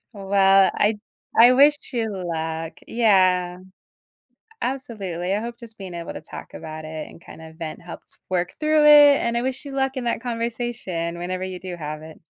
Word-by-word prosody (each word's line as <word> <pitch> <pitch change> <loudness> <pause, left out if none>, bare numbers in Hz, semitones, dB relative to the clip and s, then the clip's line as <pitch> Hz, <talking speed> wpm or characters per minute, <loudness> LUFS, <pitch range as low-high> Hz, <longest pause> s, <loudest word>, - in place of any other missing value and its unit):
Well, 195 -1 +4
I 210 0 +1 0.4
I 245 +2 +9
wish 290 +3 +6
you 235 -3 -1
luck. 160 -2 -4
Yeah. 185 -6 +3 1.0
Absolutely, 195 -9 -3
I 210 - 0
hope 235 +1 -6
just 230 -2 -10
being 190 -3 -8
able 170 -1 -6
to - - -8
talk 155 - -10
about 155 0 -8
it 155 0 -6
and - - -14
kinda 160 -1 -12
vent 160 -2 -6
helps 175 - -9
work 180 -1 -1
through 310 0 +3
it, 290 -1 +8
and 235 0 -1
I - - +1
wish 260 0 -2
you 280 - -7
luck 270 0 -1
in 255 - -2
that 235 - 0
conversation 230 -8 -3
whenever 185 +1 -3
you 185 -1 -5
do 180 -1 -6
have 155 -2 -6
it. 160 0 -12
195 Hz, 180 wpm, -23 LUFS, 170-240 Hz, 1.0 s, I